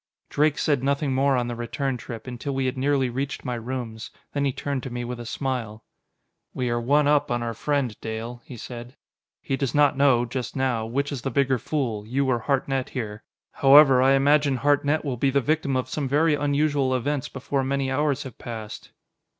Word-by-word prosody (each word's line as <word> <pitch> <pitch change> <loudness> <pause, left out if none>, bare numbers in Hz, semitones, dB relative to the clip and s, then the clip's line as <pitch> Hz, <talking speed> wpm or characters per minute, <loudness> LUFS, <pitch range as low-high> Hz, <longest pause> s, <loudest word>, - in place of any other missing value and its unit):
Drake 150 0 +2
said 140 -4 +1
nothing 140 0 0
more 135 +1 +3
on 120 -1 0
the 120 - -4
return 125 +3 -2
trip, 115 -1 -8
until 130 +2 -5
we 135 0 0
had 130 - -1
nearly 135 0 +1
reached 135 +4 -4
my 125 - -2
rooms. 115 -2 -5 0.2
Then 140 -1 0
he 135 - +2
turned 140 +1 -3
to 130 - -6
me 120 0 -4
with 120 0 -5
a 120 - -7
smile. 115 -3 -3 0.7
"We 125 -2 -1
are 120 0 0
one 145 +4 +3
up 145 0 +3
on 120 0 -1
our 115 -1 -2
friend, 135 -1 -1
Dale," 115 +2 -5
he 125 - -10
said. 120 +3 -8 0.5
"He 135 - -1
does 135 -1 -2
not 145 -1 +4
know, 135 -3 +4
just 120 +1 -5
now, 125 -4 0
which 140 +5 -1
is 135 -4 -4
the 135 - -2
bigger 130 0 +1
fool 120 -7 -2
you 135 +4 0
or 125 -2 +2
Hartnett 135 +1 -1
here. 110 -4 -5 0.3
However, 135 -1 +7
I 135 +1 +5
imagine 140 0 +3
Hartnett 145 +3 +1
will 130 -3 -2
be 135 +4 +2
the 140 +1 +2
victim 145 -1 0
of 130 -2 -2
some 140 +2 -2
very 150 +4 +3
unusual 145 -2 +1
events 140 +2 -2
before 135 +1 -2
many 135 0 -1
hours 145 0 0
have 130 -4 -10
passed!" 110 -3 -7
130 Hz, 205 wpm, -25 LUFS, 120-140 Hz, 0.7 s, However